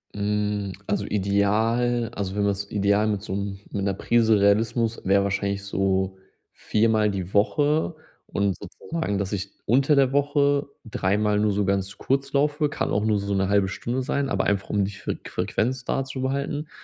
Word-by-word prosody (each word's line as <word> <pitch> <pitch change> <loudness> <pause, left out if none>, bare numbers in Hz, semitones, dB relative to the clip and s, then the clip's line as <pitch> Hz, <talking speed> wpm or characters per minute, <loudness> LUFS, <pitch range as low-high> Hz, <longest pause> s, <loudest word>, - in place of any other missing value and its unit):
Mm, 105 -1 -1 0.2
also - - 0
ideal 110 +4 +1
also, 100 -1 -3
wenn 105 - +1
man 100 - +3
es 100 +1 -6
ideal 100 +1 +2
mit 105 -2 -1
so 100 - -5
'm 100 -1 -3
mit 100 -1 -2
'ner 100 -1 +1
Prise 110 +1 +3
Realismus 115 +3 +2
wäre 100 +1 +3
wahrscheinlich 100 0 -1
so 95 -1 0 0.4
4-mal 110 -1 +2
die 95 -1 -5
Woche 150 +10 +2 0.3
und 100 -2 0
sozusagen, 105 - -4
dass 100 +1 -2
ich 100 0 -3
unter 135 +6 +3
der 135 -1 +3
Woche 145 0 +2 0.2
3-mal 105 0 +1
nur 105 -1 +2
so 100 0 0
ganz 95 0 -1
kurz 135 +1 -1
laufe, 150 +1 +1
kann - - -2
auch 100 - +1
nur 110 -1 +2
so 100 0 -2
'ne 95 0 +1
halbe 100 -1 +3
Stunde 120 +7 -3
sein, 140 0 -1
aber - - 0
einfach 100 -1 0
um 100 -2 +1
die 100 - -4
Fre - - -4
Frequenz 125 +3 -1
da 135 +1 -1
zu 130 -1 -6
behalten 140 +3 -2
105 Hz, 180 wpm, -24 LUFS, 100-125 Hz, 0.4 s, man